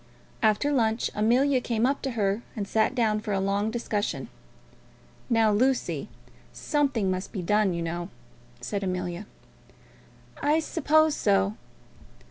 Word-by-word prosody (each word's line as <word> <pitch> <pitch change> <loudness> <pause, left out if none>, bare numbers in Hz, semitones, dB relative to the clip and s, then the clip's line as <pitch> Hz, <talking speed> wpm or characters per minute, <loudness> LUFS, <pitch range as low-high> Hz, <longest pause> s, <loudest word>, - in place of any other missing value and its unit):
After 220 +6 +2
lunch 225 -4 +1
Amelia 250 +5 +3
came 235 -1 0
up 275 +2 0
to 270 - -2
her, 200 +1 +1
and 205 -3 -3
sat 220 +5 +1
down 220 -4 +2
for 210 -1 -3
a 195 - +1
long 200 +2 0
discussion. 220 -2 -2 1.0
"Now, 225 -2 +4
Lucy, 255 +5 0 0.4
something 275 -10 0
must 185 +1 -4
be 190 - -4
done, 210 0 +2
you 170 - -2
know," 170 +2 -4 0.5
said 200 -1 -3
Amelia. 180 +1 -3 1.1
"I 300 +2 +3
suppose 315 -1 +2
so." 195 -1 +2
215 Hz, 130 wpm, -27 LUFS, 195-255 Hz, 1.1 s, Now